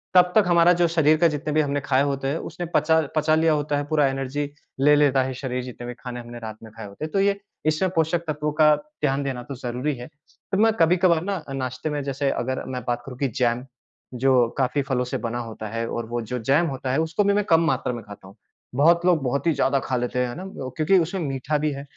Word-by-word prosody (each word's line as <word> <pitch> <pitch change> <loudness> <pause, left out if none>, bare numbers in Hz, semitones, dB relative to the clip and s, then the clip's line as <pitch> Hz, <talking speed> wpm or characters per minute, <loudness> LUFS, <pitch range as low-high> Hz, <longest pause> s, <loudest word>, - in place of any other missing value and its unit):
तब 180 0 +6
तक 215 - +6
हमारा 170 0 +5
जो 175 - +4
शरीर 155 -2 +3
का 170 +2 +5
जितने 150 -1 -3
भी 155 - +4
हमने 145 -1 -1
ख़ाए 135 -1 +2
होते 140 -1 -1
हैं 145 +4 0
उसने 175 - -5
पचा 160 +2 +4 0.2
पचा 155 0 +3
लिया 160 0 +3
होता 145 -1 0
है 145 - -1
पूरा 150 -2 +3
एनर्जी 135 +2 -3 0.3
ले 150 +1 +6
लेता 140 -2 +4
है 130 0 -3
शरीर 125 -1 -4
जितने 120 -1 -8
भी 125 - -5
ख़ाने 125 0 -7
हमने 120 0 -9
रात 110 -2 -7
में 110 - -11
ख़ाए 110 -1 -9
होते 100 +10 -7
हैं। 155 - -8
तो 195 - +1
ये 200 0 +2 0.3
इसमें 155 +4 +1
पोषक 165 +1 +1
तत्वों 150 0 -1
का 150 -1 +7
ध्यान 145 -2 -3
देना 130 -3 -4
तो 140 - -7
ज़रूरी 125 +4 -3
है। 120 0 -8 0.4
तो 195 - +1
मैं 220 +2 +4
कभी-कभार 170 0 +4
ना 195 -3 -3
नाश्ते 130 +2 -3
में 150 -1 -2
जैसे 140 0 -1
अगर 130 +2 -2
मैं 125 -1 -4
बात 120 0 -1
करूँ 130 -2 -9
कि 140 - +1
जैम 120 0 +1 0.5
जो 125 -1 +3
काफ़ी 135 +2 +1
फलों 130 -2 -1
से 125 - -3
बना 120 +1 -2
होता 110 -2 -6
है 115 +1 -3
और 115 - -3
वो 120 0 -2
जो 125 +3 -4
जैम 140 +9 +2
होता 135 -3 -3
है 135 - +1
उसको 160 +6 0
भी 200 0 +3
मैं 205 0 +2
कम 165 -3 +4
मात्रा 130 -4 0
में 120 - -6
ख़ाता 100 -2 -12
हूँ। 95 - -15 0.4
बहुत 170 +5 +4
लोग 175 -4 +4
बहुत 140 +4 -1
ही - - +5
ज़्यादा 140 -1 +1
ख़ा 130 - -2
लेते 125 +1 -2
हैं 125 - +1
है 120 - -6
ना 180 - -7 0.3
क्योंकि 160 +5 +4
उसमें 175 +3 -2
मीठा 140 0 -1
भी 150 0 0
है 140 0 -6
140 Hz, 255 wpm, -24 LUFS, 125-160 Hz, 0.5 s, का